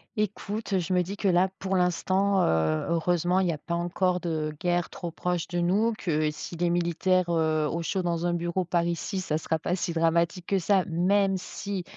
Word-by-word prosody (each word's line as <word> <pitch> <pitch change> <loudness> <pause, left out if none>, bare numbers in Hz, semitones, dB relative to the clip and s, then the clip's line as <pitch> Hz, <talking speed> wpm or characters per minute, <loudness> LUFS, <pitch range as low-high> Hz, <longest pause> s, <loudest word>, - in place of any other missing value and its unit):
Écoute, 210 0 -3
heu, - - +4
je 180 +1 -2
me 180 - +4
dis 195 +3 -5
que, 200 - 0
là, 185 +1 +4
pour 190 0 -2
l'instant, 185 +2 +2
heu, 80 -1 +1
heureusement 175 +2 +1
il 190 - +2
y 170 - +2
a 155 - -3
pas 170 +3 -5
encore 180 +1 0
de 155 -3 -2
guerre 175 -1 0
trop 175 - -5
proche 175 0 -2
de 175 - -4
nous, 200 +7 +2
que 155 -5 0
s'il 160 +3 -7
est 175 - +3
militaire, 175 +1 +1
heu, 155 -2 +1
au 170 +2 -2
chaud 185 +2 -1
dans 170 0 -1
un 175 - +1
bureau 175 +2 -1
par 170 0 0
ici, 175 +3 -2
ça 155 -4 -1
sera 160 0 -1
pas 175 +3 -1
si 180 -1 -2
dramatique 170 +2 +1
que 195 -1 +1
ça, 190 +1 +2
même 195 +3 +2
si, 195 +1 -5
175 Hz, 215 wpm, -27 LUFS, 170-190 Hz, -, heu